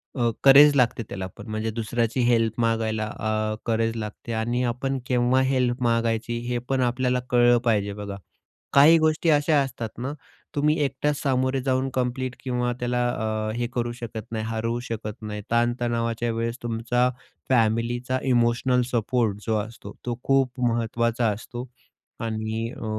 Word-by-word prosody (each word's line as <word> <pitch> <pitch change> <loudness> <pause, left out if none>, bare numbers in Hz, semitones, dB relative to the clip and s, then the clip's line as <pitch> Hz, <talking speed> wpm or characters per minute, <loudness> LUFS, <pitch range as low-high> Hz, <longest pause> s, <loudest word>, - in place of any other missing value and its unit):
अ, 120 -3 +2
courage 145 +2 +8
लागते 120 -3 +2
त्याला 95 -1 -4
पण. 105 - -10
म्हणजे 110 +1 -2
दुसऱ्याची 115 +2 -1
हेल्प 115 -1 +2
मागायला 110 -1 0
अ, 110 0 -1
करेज 115 0 0
लागते. 110 +1 -6
आणि 120 +3 0
आपण 125 +3 -1
केव्हा 125 +1 +3
हेल्प 130 -2 +1
मागायची, 115 0 0
हे 125 - 0
पण 135 -1 +1
आपल्याला 125 +1 +1
कळलं 120 0 +5
पाहिजे 100 -3 +1
बघा. 100 -1 -6 0.6
काही 150 +4 +8
गोष्टी 155 +1 +2
अशा 150 0 +4
असतात 120 -4 -4
ना, 135 +4 -3 0.4
तुम्ही 150 +2 +2
एकटाच 140 +2 -1
सामोरे 130 -1 +1
जाऊन 130 0 0
कंप्लीट 125 0 -2
किंवा 125 -1 -1
त्याला 125 0 0 0.4
अ, - - -1
हे 120 0 -1
करू 120 -1 -1
शकत 115 -3 -7
नाही, 110 -1 -3
हरवू 115 +1 -2
शकत 110 0 -5
नाही. 105 -1 -5
ताण-तणावाच्या 120 -1 0
वेळेस 115 +1 -2
तुमचा 120 +2 +1 0.4
फॅमिलीचा 120 +2 +1
इमोशनल 120 +1 +3
सपोर्ट 115 -3 0
जो 110 - +2
असतो, 105 -1 -6
तो 120 0 -3
खूप 135 -2 +1
महत्त्वाचा 115 0 0
असतो 120 +4 -7 0.5
आणि 110 0 -3
अ, 115 - -6
120 Hz, 150 wpm, -25 LUFS, 115-125 Hz, 0.6 s, करेज